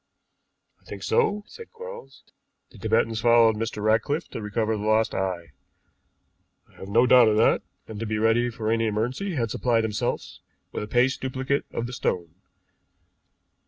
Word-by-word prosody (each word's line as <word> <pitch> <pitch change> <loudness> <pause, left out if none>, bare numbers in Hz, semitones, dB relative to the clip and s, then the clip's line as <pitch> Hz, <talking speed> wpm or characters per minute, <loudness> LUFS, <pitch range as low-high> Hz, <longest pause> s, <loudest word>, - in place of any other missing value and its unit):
"I - - -31
think - - -9
so," 210 - +1
said 460 - -12
Quarles. 475 +1 -10 0.5
"The - - -15
Tibetans 110 -1 +1
followed 115 -1 +5
Mr. 110 -1 -4
Ratcliffe 115 +9 +1
to - - -6
recover 110 +1 -1
the 105 - -5
lost 110 +1 +2
eye, 90 -4 -3 1.2
I - - -27
have 95 - -9
no 115 +5 +4
doubt 125 -1 +7
of 105 -1 +2
that, 110 - +4 0.3
and 110 -2 -8
to 115 - -3
be 110 0 -1
ready 115 +2 +2
for 110 -1 -3
any 115 0 +1
emergency 125 - -2
had 115 -5 -1
supplied 115 -2 +1
themselves 105 -2 -3 0.3
with - - -4
a 105 - -5
paste 125 +4 +1
duplicate 130 +1 -2
of 115 - -3
the 125 - -7
stone. 85 -8 -2
115 Hz, 165 wpm, -25 LUFS, 110-125 Hz, 1.2 s, doubt